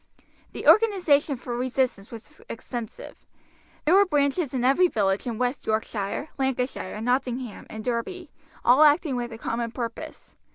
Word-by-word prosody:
The - - -6
organization 350 - +4
for 240 0 -5
resistance 250 -4 -1
was 230 -1 -12
extensive. 240 - -7 0.6
There 315 - +4
were 400 +1 +6
branches 290 -1 +1
in 255 -2 -2
every 275 +8 +4
village 200 - 0
in 230 -2 -3
West 250 +3 -2
Yorkshire, 220 +3 -2
Lancashire, 255 -6 -2
Nottingham, 250 -1 -2
and 220 0 -7
Derby 255 - -3 0.3
all 250 +5 +6
acting 300 -2 +4
with 240 -1 -3
a 225 - -7
common 230 0 -3
purpose. 230 0 -7
250 Hz, 140 wpm, -25 LUFS, 230-290 Hz, 0.6 s, were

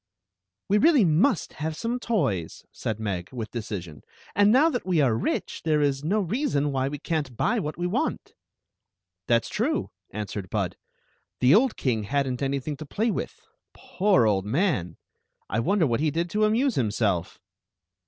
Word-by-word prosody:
" 90 +1 -61
We 205 +2 +3
really 295 - +5
must 180 - +2
have 155 +1 -3
some 235 +7 -2
toys," 135 - -1
said 110 -1 -4
Meg, 95 -4 -3
with 115 -4 -6
decision; 90 - -6 0.3
"and 205 +1 +5
now 270 +7 +6
that 245 - -2
we 180 -4 +1
are 130 -6 +3
rich, 115 - -2
there 155 -2 +2
is 140 -1 +1
no 195 +8 +1
rea 235 - -1
son 145 - 0
why 135 -1 0
we 145 +1 -4
can't 145 -6 -3
buy 235 +2 +1
what 155 -5 -4
we 175 - -2
want 180 - -2 0.9
"That 115 -1 +3
*s - - -7
true," - - -1 0.2
answered 100 -2 -5
Bud. - - -1 0.6
"The 125 +3 +5
old 245 +4 +4
king 115 -5 0
had 140 +4 0
nt 125 0 -3
anything 140 +1 -2
to 155 - -8
play 220 +9 0
with. - - -5 0.3
Poor 190 - +2
old 100 -3 +2
man! 120 - 0 0.5
I 110 - -1
wonder 185 - +2
what 120 -3 0
he 155 +1 +2
did 170 +3 -2
to 215 0 +2
amuse 240 +5 +2
himself." 105 - -1
145 Hz, 180 wpm, -26 LUFS, -, 0.9 s, now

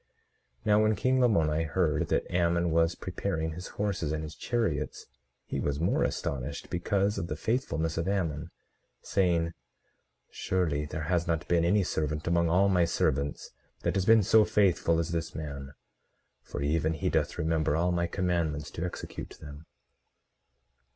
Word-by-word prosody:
18:10 - - -32
Now 105 0 +5
when 110 0 +3
king 130 +5 +2
Lamoni 80 -10 +3
heard 80 -1 0
that - - +1
Ammon 85 -1 +2
was 80 +1 +2
preparing 90 -3 -3
his 90 +3 -7
horses 100 -7 -1
and 80 0 -2
his 75 -1 -7
chariots 120 +4 -2 0.4
he - - -3
was 70 0 -1
more 85 - +1
astonished, 70 +1 -3
because 100 +3 0
of 85 - -3
the 75 - -3
faithfulness 80 - -1
of 85 - -2
Ammon, 85 -5 -1 0.5
saying: 85 -3 +1 0.8
Surely 80 -6 -1
there 80 +2 -4
has 85 +2 0
not 85 -2 -1
been 85 -1 +3
any 100 +4 +3
servant 75 -3 -2
among 85 0 +2
all 95 +4 +4
my 90 -3 +3
servants 70 -3 -1 0.3
that - - 0
has 95 -2 0
been 115 -2 +7
so 110 +2 +6
faithful 90 -6 +2
as 85 0 -1
this 85 -1 -3
man; 70 -3 -6 0.7
for 70 - -5
even 80 +2 +1
he 80 - -2
doth - - 0
remember 80 -1 +1
all 85 +2 +2
my 85 0 0
commandments 85 -5 -1
to 85 - -5
execute 90 - -6
them. 75 +1 -11
85 Hz, 160 wpm, -29 LUFS, 80-95 Hz, 0.8 s, been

